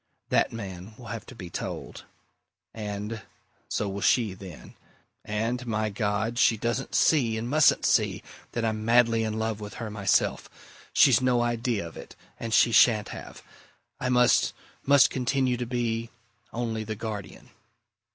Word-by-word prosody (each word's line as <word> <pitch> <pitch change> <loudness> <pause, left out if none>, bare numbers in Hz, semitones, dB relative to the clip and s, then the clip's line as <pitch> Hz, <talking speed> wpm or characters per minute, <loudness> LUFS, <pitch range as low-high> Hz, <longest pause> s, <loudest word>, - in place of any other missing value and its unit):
That - - +2
man 100 -2 -8
will 120 -3 -11
have 115 - -7
to 130 - -11
be 90 -5 -9
told! - - -6 0.7
And 105 0 -5 0.5
so 105 - -1
will 100 0 -4
she, 110 -4 +2
then. 95 -4 -11 0.5
And 115 +4 -2
my 110 -1 -1
God! 105 +3 -1
she 115 - +4
doesn't 120 +5 -2
see, 120 -8 +3
and 115 +2 -3
mustn't 150 +4 +4
see, - - +2 0.3
that 120 -1 -1
I'm 110 -1 -2
madly 115 0 +4
in 110 0 -2
love 110 -1 -2
with 105 -2 -8
her 110 -3 -5
myself! 100 -2 +1 0.4
She's - - +5
no 125 -2 +2
idea 120 -5 -1
of 80 - -12
it - - -11 0.2
and 115 - -5
she 115 - +5
shan't 110 -2 +5
have; - - -9 0.6
I 125 - -1
must 125 -1 +4 0.3
must 140 0 +6
continue 130 0 0
to 120 0 -4
be 115 -2 -2 0.4
only 115 -2 -3
the 110 0 -5
guardian!" 105 -2 -7
115 Hz, 155 wpm, -27 LUFS, 105-120 Hz, 0.7 s, must